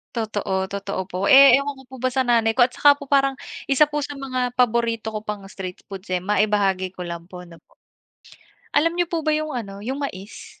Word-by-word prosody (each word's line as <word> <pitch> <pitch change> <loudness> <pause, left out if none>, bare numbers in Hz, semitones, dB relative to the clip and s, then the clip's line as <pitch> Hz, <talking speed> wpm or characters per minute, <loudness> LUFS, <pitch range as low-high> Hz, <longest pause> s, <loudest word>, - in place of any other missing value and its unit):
Totoo 205 -4 -2
totoo 195 -1 -5
po. 185 +1 -2
Eh, 275 -1 +9
ewan 280 -1 -5
ko 265 - -14
po 260 +1 -12
ba 255 - +1
sa 260 0 0
nanay 230 -1 +2
ko 245 - +7
at 250 - -7
saka 285 -1 +5
po 280 - -10
parang 275 -1 +2 0.3
isa 275 +2 +5
po 295 0 -3
sa 285 0 -6
mga 255 -2 -3
paborito 230 -2 +1
ko 215 - -4
pang 210 -2 -6
street 190 -2 -8
foods, 195 -2 -10
eh, 185 - +1
maibahagi 195 -1 +1
ko 180 - -5
lang 170 +1 -7
po 180 -1 -10
no 165 -1 -16
po? - - -32 0.9
Alam 330 +3 +2
niyo 350 -1 -1
po 335 - -1
ba 310 - +3
yung 310 0 -2
ano, 205 -6 -6
yung 265 +5 -4
mais? 205 -8 -7
230 Hz, 220 wpm, -22 LUFS, 195-275 Hz, 0.9 s, Eh